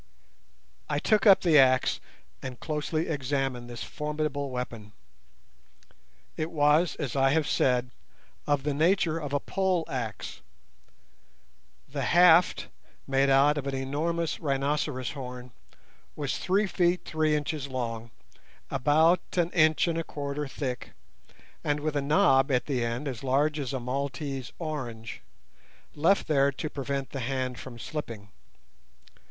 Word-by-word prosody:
I - - 0
took 215 -1 +2
up 195 - +8
the 160 -5 +5
axe 130 -1 +4 0.4
and 130 -3 -7
closely 155 +1 -2
examined 135 -4 -2
this 120 -1 -6
formidable 150 -2 -3
weapon. 115 -5 -6 1.4
It 155 +1 -2
was, 150 +2 +3
as 145 -5 -4
I 135 0 +4
have 160 -1 +1
said, 125 -1 +1 0.6
of 145 -2 +1
the 145 0 0
nature 165 +1 +2
of 145 -3 -5
a 145 - +1
pole 185 0 0
axe. 120 -4 -5 1.5
The 140 +1 -4
haft, 175 +5 +5 0.4
made 135 0 +2
out 140 +2 +4
of 140 - -5
an 135 - -2
enormous 155 +5 -2
rhinoceros 140 -3 -1
horn, 125 -2 -8 0.6
was 145 -3 -2
three 195 +3 +2
feet 180 -2 +1
three 155 -1 +1
inches 150 -1 -2
long, 115 -3 -4 0.6
about 160 +6 +4 0.2
an 175 0 +2
inch 155 -1 +3
and 165 -1 0
a - - -2
quarter 145 -1 -4
thick, 130 -3 -5 0.7
and 145 0 0
with 150 0 -2
a 145 - +1
knob 140 -2 +4
at 125 -2 +1
the 130 -5 -1
end 120 +5 -2
as 125 -5 -5
large 145 +3 +1
as 135 -4 -3
a 135 - -2
Maltese 135 +1 -4
orange, 120 -9 -5 0.7
left 165 +7 +2
there 140 -2 +3
to 150 +3 -5
prevent 140 -1 -3
the 135 - -4
hand 130 0 -2
from 125 -3 -9
slipping. 115 -5 -6
140 Hz, 135 wpm, -28 LUFS, 130-155 Hz, 1.5 s, up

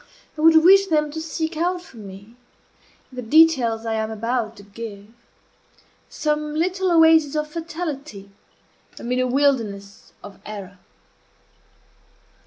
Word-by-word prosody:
I 305 - -6
would 320 0 +6
wish 390 +2 +6
them 300 -3 0
to 320 +1 -5
seek 320 +1 -4
out 355 +3 -1
for 340 -9 -16
me, 200 +2 -12 0.8
in - - -14
the - - -3
details 245 -4 +3
I 225 - -2
am 220 0 -2
about 230 +1 -3
to 200 - -13
give, 205 0 -10 1.0
some 300 0 -2
little 370 +3 0
oasis 320 -3 +5
of 305 0 -1
fatality 305 - -6 0.7
amid 250 +1 -2
a 255 - +1
wilderness 230 -8 -1
of 205 -1 -12
error. 200 -3 -9
275 Hz, 130 wpm, -22 LUFS, 220-320 Hz, 1.0 s, would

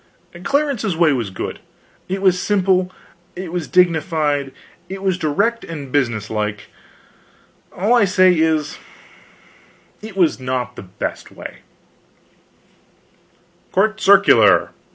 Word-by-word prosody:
Clarence's 275 - 0
way 165 -3 +4
was 120 -6 -2
good, 95 - -6 0.5
it 190 +1 -3
was 180 -1 +3
simple, 185 -2 +1 0.4
it 180 -2 -6
was 175 -3 -3
dignified, 160 -5 +1 0.4
it 195 0 -7
was 190 -2 +1
direct 200 +9 0
and 145 -5 -8
business 115 -7 -1
like; 105 -2 -3 1.0
all 205 +6 0
I 235 -4 +5
say 185 -1 +4
is, 160 -2 0 1.2
it 215 -2 -10
was 170 -6 +2
not 125 -1 -3
the - - -8
best 95 -1 -6
way: - - -10 2.1
COURT 215 +3 +1
CIRCULAR. 195 +1 +5
180 Hz, 110 wpm, -19 LUFS, 145-195 Hz, 2.1 s, I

